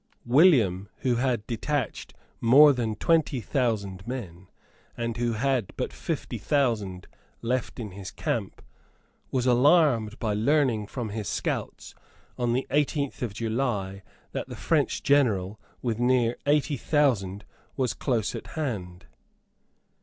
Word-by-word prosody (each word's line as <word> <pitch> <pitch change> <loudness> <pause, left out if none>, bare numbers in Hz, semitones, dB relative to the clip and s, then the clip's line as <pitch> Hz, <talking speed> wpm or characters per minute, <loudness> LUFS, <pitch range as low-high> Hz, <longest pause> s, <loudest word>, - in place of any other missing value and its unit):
William, 120 - +4
who 125 -2 +1
had 120 -4 0
detached 130 +3 -3 0.2
more 140 +5 +7
than 115 -4 -2
twenty 160 -1 +2
thousand 105 -6 -2
men, 95 -8 -6 0.5
and 115 0 -3
who 120 -1 0
had 125 -2 0
but - - -3
fifty - - -4
thousand 110 -10 0 0.4
left 125 +2 -2
in 110 -4 -5
his 95 0 -8
camp, - - -3 0.7
was 130 -2 0
alarmed 125 -4 +4
by 110 -3 -1
learning 115 -1 +2
from 120 -2 -5
his 105 -1 -4
scouts, - - -3 0.4
on 120 -1 0
the 130 +2 0
eighteenth 145 -1 0
of 120 -4 -2
July, 110 -5 -2 0.3
that - - -4
the - - -6
French - - 0
General, 105 -8 +2 0.2
with 115 -3 -1
near 120 -1 +2
eighty 145 0 +2
thousand, 105 -9 +1 0.3
was 130 -3 0
close 115 -6 -1
at - - -7
hand. 95 - -4
120 Hz, 130 wpm, -26 LUFS, 105-135 Hz, 0.7 s, more